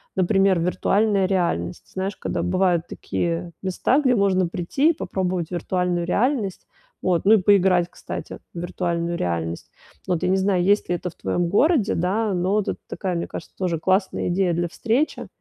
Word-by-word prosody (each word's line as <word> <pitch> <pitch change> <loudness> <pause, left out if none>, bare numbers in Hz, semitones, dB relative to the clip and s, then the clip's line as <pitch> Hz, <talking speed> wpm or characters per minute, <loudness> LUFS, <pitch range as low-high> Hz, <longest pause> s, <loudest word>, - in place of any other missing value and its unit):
например, 195 -1 +3
виртуальная 195 +3 +2
реальность. 175 - -1
Знаешь, 190 +1 -3
когда - - -3
бывают 180 -2 +1
такие 170 0 -3
места, 190 +9 +1
где 255 -3 +3
можно 190 -3 +2
прийти 180 - +1
и - - +3
попробовать 185 - -3
виртуальную 180 0 -1
реальность, 220 -1 0 0.4
вот, 180 -1 +1
ну, 215 - +7
и - - +7
поиграть, 185 -3 +4
кстати, - - -7 0.2
в 170 - -4
виртуальную 170 -1 -2
реальность. 85 -1 -3 0.4
Вот, 175 -3 0
я - - +1
не 190 - +3
знаю, 190 -2 +1
есть 205 +3 +2
ли 175 - +2
это 180 0 -5
в - - -25
твоём 175 -1 -1
городе, 250 - +3
да, 200 +4 0
но 180 +2 0
вот 210 -1 +1
это - - -3
такая, 185 -3 -3
мне 170 - -2
кажется, - - -9
тоже 180 -3 -1
классная 190 +3 +1
идея 180 0 +1
для 175 +1 0
встречи. 235 - -1
185 Hz, 175 wpm, -23 LUFS, 175-200 Hz, 0.4 s, ну